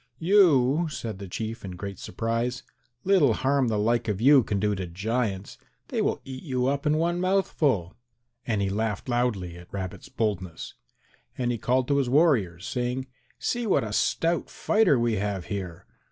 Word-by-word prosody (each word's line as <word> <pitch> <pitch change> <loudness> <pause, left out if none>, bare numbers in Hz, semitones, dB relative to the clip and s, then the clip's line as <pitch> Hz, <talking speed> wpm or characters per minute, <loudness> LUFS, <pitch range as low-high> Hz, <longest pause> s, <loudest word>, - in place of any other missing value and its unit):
"You!" 165 -5 +4
said 110 -9 -5
the 100 - -7
Chief 110 +5 -5
in 95 -2 -6
great 100 +1 -7
surprise; 115 +5 -2 0.4
"little 180 - +4
harm 135 +2 +1
the 110 -2 0
like 115 +3 +1
of 105 -3 -1
you 135 +3 +7
can 105 -3 -2
do 105 +1 +1
to 95 -2 -4
giants; 100 +2 -3 0.3
they - - -1
will - - 0
eat 130 -1 -7
you 130 -4 -1
up 140 +2 0
in 150 +1 +3
one 175 +2 0
mouthful," 150 - +1 0.5
and 105 -4 0
he 100 - 0
laughed 105 +1 -2
loudly 115 -8 -1
at 90 0 -14
Rabbit's 95 -2 -6
boldness. 95 -7 -3 0.6
And 120 -1 0
he 120 - -3
called 125 +2 +1
to 140 - +3
his 135 -3 +1
warriors 120 - +2
saying, 125 +1 -2 0.3
"See 240 -2 -2
what 190 - +3
a 105 -1 -5
stout 165 +9 +1
fighter 215 -10 +3
we 115 -2 +1
have 100 -2 -2
here! 90 -4 -6
120 Hz, 175 wpm, -26 LUFS, 100-140 Hz, 0.6 s, you